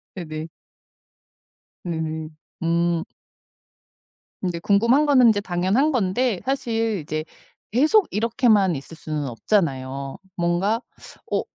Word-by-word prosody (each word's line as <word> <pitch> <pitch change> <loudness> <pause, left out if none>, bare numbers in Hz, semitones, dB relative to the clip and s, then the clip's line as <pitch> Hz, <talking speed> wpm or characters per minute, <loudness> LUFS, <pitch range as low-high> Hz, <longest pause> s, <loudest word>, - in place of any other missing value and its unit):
네네. 155 -3 -5 1.4
음. 160 -2 -3 0.3
음. 170 0 +1 1.4
근데 175 -3 -2
궁금한 230 - +3
거는 260 -4 +6
인제 205 -2 +3
당연한 195 - +1
건데 225 - +1
사실 225 -6 0
이제 155 +1 -3 0.5
계속 310 - +4
이렇게만 215 - +3
있을 140 +4 -8
수는 155 -2 -3
없잖아요. 135 - -1 0.2
뭔가 180 +7 +1 0.5
어 - - +2
185 Hz, 205 characters per minute, -23 LUFS, 160-230 Hz, 1.4 s, 거는